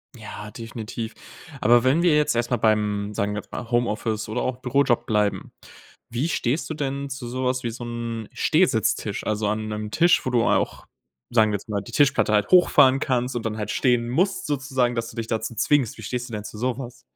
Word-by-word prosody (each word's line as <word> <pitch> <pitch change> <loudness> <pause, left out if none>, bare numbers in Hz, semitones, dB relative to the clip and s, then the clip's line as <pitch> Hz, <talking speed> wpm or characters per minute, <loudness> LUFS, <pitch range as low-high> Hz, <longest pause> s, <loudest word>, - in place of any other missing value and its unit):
Ja, 105 -1 -9
definitiv. 115 0 -6 0.5
Aber 120 +2 +5
wenn 140 +7 +3
wir 165 -4 +4
jetzt 150 -3 +2
erstmal 120 +1 0
beim, 105 -1 +1
sagen 100 +1 -1
wir 105 - -3
jetzt - - -27
mal 120 0 -6
Homeoffice 110 -2 -1
oder 110 +3 -2
auch 130 -1 -2
Bürojob 125 -2 +1
bleiben, 105 -2 0 0.6
wie 125 +8 -1
stehst 140 0 -1
du 160 - -3
denn 140 -1 -3
zu 135 -2 -6
sowas 130 +1 -1
wie 120 - -2
so 120 +2 -8
'n 115 -2 -5
Stehsitztisch? 110 - +1
Also, 105 0 0
an 110 +1 -2
'nem 105 0 -4
Tisch, 170 +9 +3
wo - - 0
du 120 -2 +2
auch, - - 0 0.5
sagen 110 -2 +4
wir - - 0
jetzt 100 - -7
mal, 100 -2 -1
die - - -11
Tischplatte 140 -6 +3
halt 105 0 +2
hochfahren 145 -7 +6
kannst 125 -3 -1
und 120 - -2
dann 110 -1 -2
halt 105 -1 -3
stehen 120 -3 +2
musst 185 +10 0
sozusagen, 130 -4 0
dass 115 -1 -3
du - - -13
dich 115 - -3
dazu 110 +1 -3
zwingst. 135 +1 +1
Wie 110 - -10
stehst 125 +3 -4
du - - -10
denn 105 -1 -4
zu 105 - -9
sowas? 125 0 -4
120 Hz, 210 wpm, -24 LUFS, 110-130 Hz, 0.6 s, hochfahren